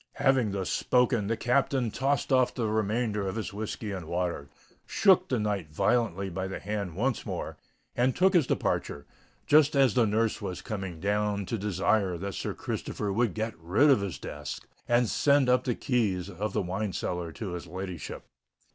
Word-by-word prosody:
Having 130 Hz, -5 st, +2 dB
thus 95 Hz, -3 st, -2 dB
spoken, 125 Hz, -4 st, +2 dB
the 115 Hz, +1 st, 0 dB
Captain 125 Hz, -1 st, +1 dB
tossed 135 Hz, +2 st, 0 dB
off 130 Hz, -1 st, +3 dB
the 120 Hz, -, -1 dB
remainder 110 Hz, -1 st, 0 dB
of 95 Hz, -, -3 dB
his 110 Hz, -2 st, -4 dB
whiskey 105 Hz, 0 st, -4 dB
and 90 Hz, -5 st, -5 dB
water, 85 Hz, -5 st, -2 dB, 0.4 s
shook 185 Hz, -2 st, +4 dB
the 125 Hz, -, +1 dB
knight 100 Hz, -7 st, -2 dB
violently 100 Hz, +2 st, +1 dB
by 95 Hz, +1 st, -3 dB
the 95 Hz, -, -5 dB
hand 100 Hz, -4 st, -4 dB
once 120 Hz, +4 st, 0 dB
more, -, -, -5 dB, 0.4 s
and 125 Hz, +1 st, +2 dB
took 190 Hz, +1 st, +4 dB
his 165 Hz, -8 st, +4 dB
departure, 70 Hz, 0 st, -1 dB, 0.4 s
just 150 Hz, -1 st, +5 dB
as 135 Hz, -4 st, +4 dB
the 120 Hz, -3 st, +3 dB
nurse 110 Hz, +2 st, 0 dB
was 95 Hz, -3 st, -5 dB
coming 95 Hz, -6 st, -5 dB
down 100 Hz, +1 st, 0 dB
to 115 Hz, -, -2 dB
desire 100 Hz, -2 st, +1 dB
that 100 Hz, +3 st, -5 dB
Sir -, -, -4 dB
Christopher 100 Hz, -2 st, -3 dB
would 115 Hz, -2 st, +1 dB
get 110 Hz, 0 st, -2 dB
rid 100 Hz, -, +4 dB
of 130 Hz, -, +4 dB
his 100 Hz, -3 st, -3 dB
guest 75 Hz, 0 st, -7 dB, 0.2 s
and 120 Hz, 0 st, +3 dB
send 140 Hz, +3 st, +3 dB
up 125 Hz, 0 st, +3 dB
the 120 Hz, -, 0 dB
keys 100 Hz, -8 st, 0 dB
of 100 Hz, +3 st, -3 dB
the -, -, 0 dB
wine 95 Hz, +2 st, -2 dB
cellar 90 Hz, -2 st, -3 dB
to 105 Hz, -5 st, -5 dB
her 90 Hz, -, -3 dB
ladyship. 90 Hz, 0 st, -6 dB
105 Hz, 180 wpm, -28 LUFS, 95-125 Hz, 0.4 s, just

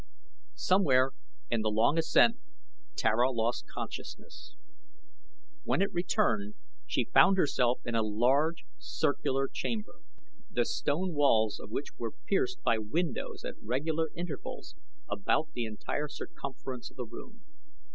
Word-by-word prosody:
Somewhere 140 Hz, -9 st, +4 dB, 0.4 s
in 115 Hz, -, +2 dB
the 110 Hz, -, +1 dB
long 115 Hz, +9 st, +3 dB
ascent 230 Hz, +8 st, +5 dB, 0.6 s
Tara 120 Hz, +4 st, +3 dB
lost 115 Hz, -1 st, -1 dB
consciousness. 390 Hz, -6 st, -8 dB, 1.1 s
When -, -, +1 dB
it 200 Hz, -, -2 dB
returned 200 Hz, +3 st, +1 dB, 0.3 s
she -, -, -1 dB
found 195 Hz, -, +7 dB
herself 125 Hz, -7 st, +2 dB
in 120 Hz, -, -3 dB
a 115 Hz, -, +3 dB
large, 130 Hz, +10 st, +2 dB
circular 145 Hz, -, 0 dB
chamber, 215 Hz, +7 st, -4 dB, 0.5 s
the 120 Hz, -, +1 dB
stone 170 Hz, +4 st, -1 dB
walls 115 Hz, -8 st, +3 dB
of -, -, -9 dB
which 135 Hz, +6 st, -4 dB
were 115 Hz, -2 st, -4 dB
pierced 375 Hz, -, 0 dB
by 115 Hz, -, +3 dB
windows 155 Hz, +9 st, -2 dB
at -, -, -7 dB
regular 155 Hz, +7 st, -1 dB
intervals 170 Hz, -4 st, -6 dB, 0.3 s
about 160 Hz, -5 st, 0 dB
the 120 Hz, -, -2 dB
entire 110 Hz, +7 st, -3 dB
circumference 135 Hz, -3 st, -7 dB
of -, -, -24 dB
the 125 Hz, -, -3 dB
room. 220 Hz, -, -11 dB
140 Hz, 125 wpm, -31 LUFS, 120-175 Hz, 1.1 s, found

